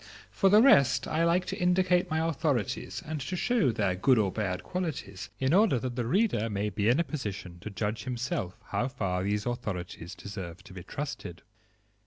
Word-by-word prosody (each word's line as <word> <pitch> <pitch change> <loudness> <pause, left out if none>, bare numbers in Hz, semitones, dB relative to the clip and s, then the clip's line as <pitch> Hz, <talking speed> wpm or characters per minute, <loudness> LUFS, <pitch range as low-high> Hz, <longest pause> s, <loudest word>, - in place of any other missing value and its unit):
For 195 - +3
the 210 +3 +7
rest, 140 - +5
I 160 +2 +1
like 170 +2 +2
to - - -3
indicate 180 0 +3
my 160 +1 +1
authorities 150 - -1
and 155 -2 -4
to 135 +7 -3
show 215 - +2
their 105 -5 0
good 125 +8 +3
or 100 -3 +2
bad 95 -4 -2
qualities, 150 - -4
in 130 +3 +1
order 200 - +5
that 120 0 -4
the 120 -2 -2
reader 170 - +2
may 105 0 -1
be 105 +2 +1
in 125 +6 +4
a - - +3
position 100 - -6
to 105 - -7
judge 105 +2 -3
himself 120 -6 -3
how 125 - 0
far 95 -9 -2
these 105 +2 -1
authorities 95 -7 -4
deserve 95 -4 -8
to 105 - -13
be 95 - -8
trusted. 95 - -6
120 Hz, 190 wpm, -29 LUFS, 100-160 Hz, -, the